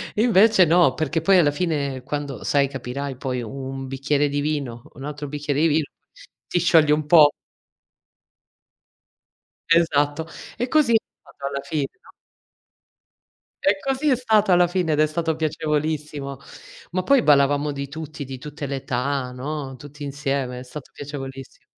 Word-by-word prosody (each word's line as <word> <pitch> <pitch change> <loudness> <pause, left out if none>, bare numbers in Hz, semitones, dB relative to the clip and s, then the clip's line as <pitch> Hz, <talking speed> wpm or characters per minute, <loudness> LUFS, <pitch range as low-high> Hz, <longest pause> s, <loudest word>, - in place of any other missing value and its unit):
Invece 215 -3 +5
no, 170 -4 +4
perché 155 +1 -1
poi 195 +3 +5
alla 155 -5 +4
fine 145 -5 -2
quando, 145 -1 -5
sai, 140 -1 +2
capirai 135 0 -5
poi 130 -1 -3
un 135 +2 -6
bicchiere 140 +2 0
di 145 0 -1
vino, 140 -6 -3
un 135 - -10
altro 150 0 -5
bicchiere 145 0 -2
di 165 - +5
vino, 155 -1 +2 0.6
ti 175 - 0
sciogli 160 -3 +4
un 150 0 +2
po'. 150 -2 +7 2.4
Esatto, 160 -2 +2 0.3
e 245 - -1
così 280 -4 +3
è - - +7 0.2
stato 140 -1 -8
alla 140 0 -3
fine, 145 -2 -2
no? - - -18 1.5
E 195 0 +3
così 270 +6 0
è 265 - +4
stato 220 -5 +2
alla 175 0 +5
fine 175 -2 0
ed 150 - 0
è 155 - +5
stato 160 +1 -1
piacevolissimo. 150 -2 -2 0.5
Ma 185 +1 -1
poi 270 +3 +4
ballavamo 145 0 +3
di 140 0 -5
tutti, 155 0 -7
di 135 -1 -7
tutte 150 +3 -7
le 140 - -3
età, 130 0 -2
no, 135 +1 -5
tutti 145 +2 -11
insieme. 135 -3 -2
È 125 - -8
stato 130 +2 -10
piacevolissim 135 -2 -8
145 Hz, 155 wpm, -23 LUFS, 140-160 Hz, 2.4 s, po